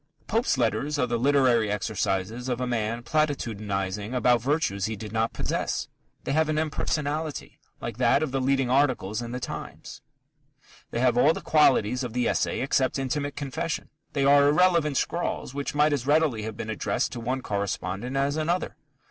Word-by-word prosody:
Pope's 225 - +1
letters 125 +5 0
are 125 - +2
the 120 -1 -1
literary 125 -5 +3
exercises 105 +3 -2
of 125 -1 -1
a 125 - -1
man 115 -1 -2
platitudinizing 110 -7 -1
about 125 -2 +3
virtues 120 -8 0
he 110 +1 -2
did 105 +1 -8
not 115 +1 0
possess. - - -2 0.3
They - - -3
have 155 +2 +2
an 155 - 0
impersonality, 155 0 -2 0.2
like - - -5
that 140 - +3
of 150 - -2
the 135 0 -1
leading 135 0 +2
articles 125 -5 +1
in 120 0 -6
The 125 - -3
Times. - - -7 0.9
They 115 - -2
have 125 -1 +3
all 150 +5 +5
the - - -5
qualities 125 -5 +3
of 120 -3 -5
the 125 0 +1
essay - - 0
except 130 0 +1
intimate 145 +2 -2
confession. 145 +3 -3 0.2
They 140 -2 +1
are 140 0 +6
irrelevant 155 -2 +3
scrawls 170 -6 -2
which 140 +1 -4
might 150 +1 +4
as 135 -2 -2
readily 150 -6 +3
have 110 0 -6
been 110 - -4
addressed 110 - -1
to - - -5
one 125 +3 -2
correspondent 100 +4 -3
as 140 +2 +1
another. 170 +4 -1
130 Hz, 175 wpm, -26 LUFS, 115-145 Hz, 0.9 s, are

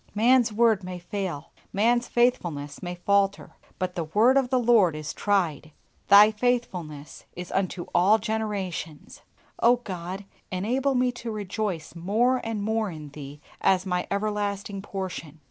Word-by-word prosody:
Man's 235 +2 +4
word 220 -2 +3
may 180 0 -6
fail, 175 -4 -5 0.2
man's 240 +4 +2
faithfulness 170 - 0
may 180 -1 -5
falter, 200 +2 +1 0.3
but 185 -1 -2
"the 170 -2 -3
word 220 +11 +4
of 270 -2 +2
the 260 - +2
Lord 225 -9 +4
is 155 0 -5
tried," 175 -7 0 0.4
Thy 205 +2 +8
faithfulness 185 - -3
is 180 0 -7
unto 185 -2 -1
all 195 +5 +5
generations! 205 -8 -4 0.4
O 240 +1 +5
God, 190 -4 -6 0.3
enable 250 +9 0
me 250 0 +2
to 240 -1 -7
rejoice 205 -5 -4
more 220 +9 +1
and 225 -2 -3
more 220 0 0
in 155 -4 -8
Thee 145 0 -10 0.2
as 185 -1 +3
my 180 -1 -1
everlasting 200 -1 -2
portion. 185 -6 -6
200 Hz, 145 wpm, -26 LUFS, 175-225 Hz, 0.4 s, Thy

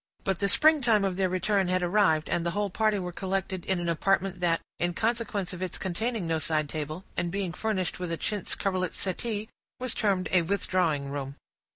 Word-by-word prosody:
But 190 -2 0
the 200 - +1
springtime 245 -10 +5
of 190 -2 0
their 190 0 +1
return 190 +1 +1
had 185 0 +1
arrived, 175 -4 +3
and 170 - 0
the 170 - 0
whole 205 -2 0
party 215 +1 +2
were 180 -2 -3
collected 190 0 -2
in 190 -2 +1
an 175 - -2
apartment 190 +2 +1
that, 170 -2 +2 0.2
in 175 0 0
consequence 220 -4 -1
of 180 - -7
its 185 -2 -2
containing 220 +3 -2
no 165 -1 0
side 155 -2 0
table, 155 +3 -4
and 175 - -1
being 190 -2 -2
furnished 190 -3 -1
with 180 -2 -3
a 165 - -1
chintz 205 0 -2
coverlet 185 -2 -1
settee, 210 +3 -2 0.3
was 255 -1 +1
termed 195 -4 +1
a 185 - +5
withdrawing 165 -6 0
room. 140 -1 -4
185 Hz, 200 wpm, -28 LUFS, 170-205 Hz, 0.3 s, springtime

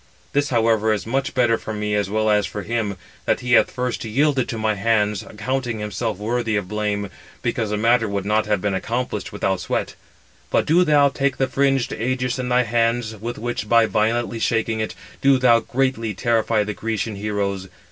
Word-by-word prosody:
This, 145 0 +1
however, 115 -2 +2
is 105 -3 -3
much 135 +4 -1
better 120 -3 +3
for 110 - -6
me 105 0 -2
as 100 -2 0
well 110 +1 +1
as 105 -1 +2
for 105 - -6
himself, 110 -3 -2 0.3
that - - +1
he 125 0 0
hath - - +6
first 125 -1 -3
yielded 130 +3 +1
to 115 - -3
my 110 0 +1
hands, 105 -1 +1
accounting 120 +2 -3
himself 105 -3 -3
worthy 115 +1 -1
of 100 -3 -1
blame, 105 -1 -2 0.3
because 110 -3 -1
the 105 - -1
matter 115 +1 +3
would 100 -1 -2
not 105 +1 +1
have 105 -3 +1
been 100 -1 0
accomplished 120 +6 -3
without 95 -1 -1
sweat. - - -2 0.6
But - - +2
do 170 +4 +4
thou 145 -4 +4
take 140 0 -1
the 135 - +2
fringed 135 -1 +1
ægis 125 +2 -1
in 125 -1 -2
thy 125 0 +3
hands, 115 0 0
with 115 +3 -5
which, 115 -2 -4
by 115 -1 +5
violently 115 +2 0
shaking 115 0 0
it, 110 - -3 0.3
do 135 -1 +5
thou 120 -2 +5
greatly 120 -4 -1
terrify 115 +2 +1
the 105 +1 -4
Grecian 110 0 -3
heroes. 100 -2 -2
115 Hz, 195 wpm, -22 LUFS, 105-125 Hz, 0.6 s, hath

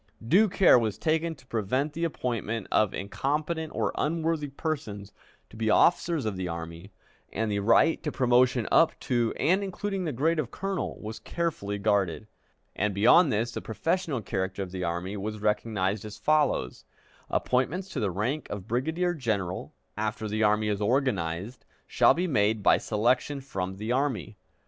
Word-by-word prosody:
Due 200 - +5
care 180 -8 +6
was 110 -3 -2
taken 160 +1 0
to 130 -3 -20
prevent 130 +6 -1
the 165 - -3
appointment 115 - -3
of 105 -3 +3
incompetent 150 +9 -2
or - - 0
unworthy 160 -1 0
persons 135 -9 -4 0.4
to - - -16
be 110 0 -1
officers 165 +4 +3
of 105 -3 -2
the 95 -1 -3
army, 85 +3 -7 0.4
and 110 0 -1
the 100 - 0
right 115 +10 +4
to 150 - -3
promotion 125 -2 +3
up 165 - +4
to 120 -4 0
and 190 +4 +2
including 195 0 -3
the 155 - -1
grade 155 +6 +1
of 135 -6 -2
colonel 195 +6 -4
was 110 +1 -6
carefully 145 -13 -3
guarded, 100 -2 0 0.5
and 105 -1 -1
beyond 135 - +6
this 115 +3 0
the - - -5
professional 160 - -1
character 95 0 -2
of 90 - -8
the 90 -1 -4
army 85 +4 -3
was 105 +2 -4
recognized 105 -2 -1
as 105 -1 -8
follows: 150 - +1 0.5
"Appointments 150 +10 0
to 150 - -4
the 105 -4 0
rank 115 - -2
of 100 -1 -6
brigadier 160 +10 0
general, 100 - -2 0.2
after 110 0 -3
the 110 +1 -2
army 105 0 +3
is 105 -1 -1
organized, 105 -4 -1 0.2
shall - - +4
be 180 - 0
made 110 - +1
by - - +5
selection 125 +6 0
from 95 -8 -4
the 110 +3 -3
army." 130 -5 -1
115 Hz, 165 wpm, -27 LUFS, 105-155 Hz, 0.5 s, care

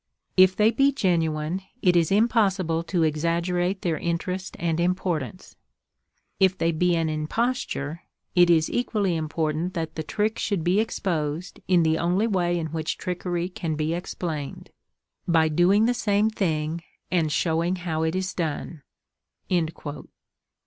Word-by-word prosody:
If 185 0 +6
they 215 +1 +4
be 275 +3 +3
genuine, 165 - 0 0.2
it 180 -1 +4
is 170 -1 +3
impossible 195 -6 +2
to 175 -2 +1
exaggerate 170 +4 0
their 165 -3 0
interest 180 +2 -3
and 165 -1 -1
importance. 180 -2 -2 0.8
If 190 -1 +4
they 165 - +1
be 175 +2 +2
an 165 -1 +1
imposture 155 - -2 0.3
it 175 -1 +5
is 160 -2 +4
equally 210 -7 0
important 160 +2 -2
that 165 -2 -3
the 160 - -4
trick 215 +7 -1
should 200 -6 -1
be 180 +4 +3
exposed 170 -6 -2
in 180 -2 +4
the 160 0 +2
only 180 +5 +2
way 175 -5 +1
in 160 -3 -3
which 160 -1 -2
trickery 175 -1 -2
can 170 -3 -3
be 155 +2 -1
explained—by 165 0 -3
doing 180 +7 +4
the 245 - +3
same 215 -2 +1
thing, 160 -5 -1 0.3
and 165 -4 +1
showing 165 +3 +1
how 170 -3 -3
it 160 +2 0
is 185 0 -2
done." 160 -1 -3
175 Hz, 140 wpm, -25 LUFS, 160-190 Hz, 0.8 s, If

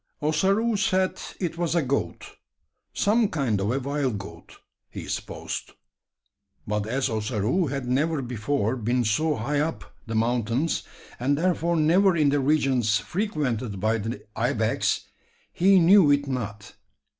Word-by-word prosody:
Ossaroo 195 +9 +1
said 190 -2 0 0.2
it 170 -2 -3
was 175 -1 0
a 170 - +2
goat 130 -11 -2 0.6
some 220 +2 +2
kind 125 -10 0
of 100 +3 0
a 135 - 0
wild 140 -4 -1
goat, 85 -5 -11 0.3
he - - -8
supposed; - - -5 0.9
but 105 0 -2
as 130 +4 0
Ossaroo 110 - 0
had 135 -1 -3
never 145 +3 0
before 120 0 -1
been 120 +1 0
so 150 +8 +1
high 145 +6 -1
up 160 +2 -3
the 115 - -3
mountains, 120 +6 0 0.4
and 140 +4 +1
therefore 170 0 +1
never 175 +4 +4
in 150 -2 +4
the 145 +1 +2
regions 130 -6 +2
frequented 130 - -2
by 110 +3 +1
the 115 +4 -5
ibex, - - 0 0.5
he 190 +2 +5
knew 180 -1 +6
it 145 0 +2
not. 110 -6 -5
140 Hz, 140 wpm, -25 LUFS, 115-165 Hz, 0.9 s, knew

